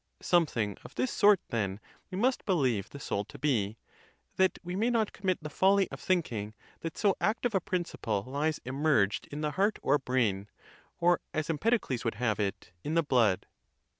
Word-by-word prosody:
Something 120 - +1
of - - -12
this 255 - 0
sort, 205 -2 +5
then, 100 -5 -1 0.3
we 185 - -5
must 250 +5 +1
believe 125 - +1
the 140 - -9
soul 100 -6 -2
to - - -12
be, 115 -7 0 0.6
that 190 0 +3
we 180 +1 -4
may 220 +5 +1
not 225 -3 +1
commit 185 -4 -1
the - - -3
folly 195 +4 +4
of - - -7
think 180 -6 0
ing 105 -1 -5 0.2
that 165 -1 -6
so 200 -3 +3
active 225 +2 +1
a 190 - +2
principle 165 - -2
lies 145 +4 -1
immerged 130 -6 +1
in 145 +1 -6
the 150 -1 0
heart 200 +6 +1
or 145 - +3
brain; 110 -7 0 0.5
or, 175 0 +4 0.2
as 155 +1 0
Empedocles 165 - 0
would 115 -3 -1
have 110 -1 0
it, 100 -3 -3
in 155 - -2
the 165 - +4
blood. 120 -9 +2
150 Hz, 185 wpm, -30 LUFS, 115-185 Hz, 0.6 s, sort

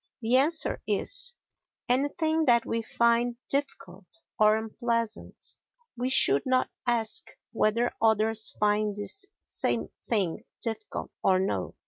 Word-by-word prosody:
the 235 +1 +1
answer 310 +5 +2
is, - - +2 0.5
"Anything 315 +5 +1
that 235 -3 +4
we 230 - -2
find 235 +1 +1
difficult 195 -10 -3 0.3
or 215 0 +5
unpleasant." 230 0 -3 0.4
We 250 +1 -2
should 140 - +4
not 255 0 +1 0.2
ask 230 -2 0 0.2
whether 230 +1 +1
others 220 0 +3
find 210 0 +1
this 390 - +1 0.2
same - - -1 0.2
thing 205 -2 0 0.2
difficult 220 -2 -4
or 190 -1 +4
no. 190 - -2
230 Hz, 115 wpm, -27 LUFS, 215-255 Hz, 0.5 s, or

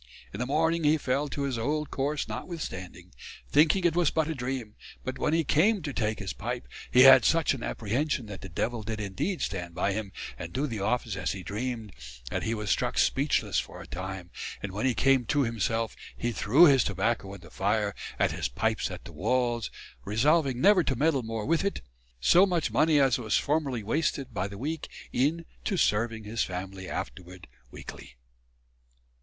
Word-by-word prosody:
In 100 - -6
the 125 - -1
morning 160 +3 +1
hee 150 +1 +4
fell 140 +1 0
to 140 - -3
his 130 -4 -1
old 150 +5 -1
cours 140 0 -1
notwithstanding; 110 - -6 0.3
thinking 155 +6 +4
it 170 -2 +3
was 175 -4 +3
but 160 -2 0
a 160 - -1
dream: 125 -5 -4 0.3
but 130 0 -4
when - - +1
hee 165 0 +3
came 190 +7 +3
to 145 -3 -4
take 110 -2 -1
his 100 -3 -4
pipe, 120 +3 -5 0.2
hee 125 - +6
had 135 0 +9
such 165 -3 +3
an 135 - -6
apprehension 125 +5 -1
that 100 -2 -8
the 95 - -8
devill 115 +7 -2
did 110 +1 -4
indeed 105 - -2
stand 90 -3 -4
by 100 - 0
him 105 -1 -4 0.3
and 85 +1 -6
doe 140 - 0
the 115 -7 -4
office 110 +1 -1
as 95 -2 -2
hee 95 -1 -7
dreamed 115 +1 -4 0.4
that - - -1
hee 115 - -1
was 105 -2 -2
struck - - 0
speechless - - +2
for - - -7
a - - -9
time 95 -1 -6 0.3
and 100 - -3
when 105 +7 -1
hee 125 - +1
came 135 -2 +4
to 145 +5 +2
himself 115 -1 -1 0.2
hee 120 - -1
threw 125 +9 +5
his 135 -6 +6
tobacco 100 +1 -1
in 95 - -12
the - - -14
fire 105 +1 0 0.2
and - - +2
his - - -2
pipes - - 0
at - - -8
the - - -10
walls; 120 +1 0 0.3
resolving 135 - +2
never 195 +4 +5
to 135 - 0
meddle 140 +1 +2
more 110 -2 -4
with 165 +3 +2
it: 200 - -2 0.4
soe 175 - +6
much 175 -4 0
money 155 -1 +4
as 135 -3 +3
was 110 -3 +1
formerly 140 -6 0
wasted 135 +1 -1
by 95 -1 -1
the 100 0 -9
week 155 +7 -4 0.2
in 155 +6 +1 0.2
to 195 - -1
serving 110 -3 +1
his 110 +2 -1
family 95 +1 -6
afterward 90 +8 -6 0.2
weekly." - - -10
120 Hz, 195 wpm, -28 LUFS, 105-150 Hz, 0.4 s, had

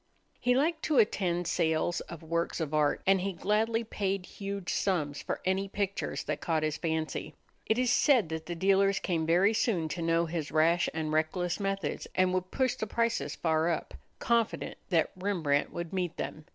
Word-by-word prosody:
He 250 0 +2
liked 315 +4 +1
to 305 - +1
attend 180 -6 +2
sales 160 +1 +1
of 170 -1 -8
works 170 +2 -1
of 155 -2 -3
art, 150 -1 +2
and 195 -1 +4
he 195 +1 -2
gladly 220 +6 +1
paid 195 -4 -2
huge 200 -2 -5
sums 150 -7 0
for - - -3
any 190 +1 +1
pictures 200 0 -2
that - - -3
caught 160 -2 0
his 155 -1 0
fancy. 160 -2 -3 0.3
It 220 - +2
is 250 -1 +2
said 245 - +4
that 160 0 -5
the 175 - -3
dealers 195 +2 +3
came 165 -4 -1
very 185 +6 +4
soon 195 -7 +1
to 170 +3 -4
know 165 0 +2
his 160 -2 -4
rash 165 +2 +3
and 155 -1 -3
reckless 170 +4 0
methods 195 -5 -2
and 185 -1 +3
would 185 0 -1
push 260 +2 +1
the 220 - -4
prices 230 +2 0
far 160 0 +1
up, 165 - -2 0.2
confident 235 -2 0
that 165 -4 +2
Rembrandt 175 -7 0
would 170 0 -5
meet 180 -3 -2
them. 155 - -5
180 Hz, 185 wpm, -30 LUFS, 160-200 Hz, 0.3 s, and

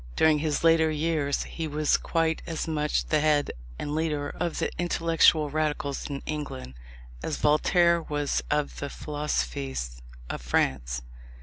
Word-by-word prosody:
During 155 -1 +4
his 150 0 -1
later 165 -1 +5
years 155 -2 0
he 165 -1 -5
was 150 0 +2
quite 165 -1 0
as 165 -1 -3
much 150 -2 0
the 155 - +2
head 150 -1 +2 0.3
and 145 - -4
leader 150 -2 -1
of 175 -2 -3
the - - -1
intellectual 165 -3 +3
radicals 150 -2 -1
in 140 -1 -5
England, 105 - -5 0.5
as - - -2
Voltaire 170 +3 +4
was 145 -2 -1
of 150 -1 0
the 140 - -3
philosophes 65 - -3 0.3
of - - -5
France. - - 0
150 Hz, 140 wpm, -27 LUFS, 140-160 Hz, 0.5 s, later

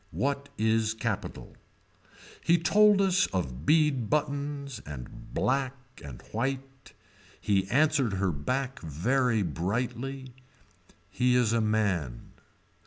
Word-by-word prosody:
What 140 +1 -2
is 110 0 +1
capitol. 110 -3 -4 0.9
He 170 - +4
told 205 +4 +5
us 190 -1 +3
of 75 -7 -4
bead 150 -8 +3
buttons 140 -3 -2
and 65 -5 -9
black 135 -1 0 0.3
and 70 -4 -9
white. 135 0 -4 0.5
He 95 -2 +1
answered 140 -4 +2
her 95 -1 0
back 130 - -2
very 110 - +1
brightly. 125 - -3 0.8
He 125 0 +2
is 120 -3 +3
a 115 - +2
man. 100 - -1
125 Hz, 105 wpm, -28 LUFS, 100-140 Hz, 0.9 s, told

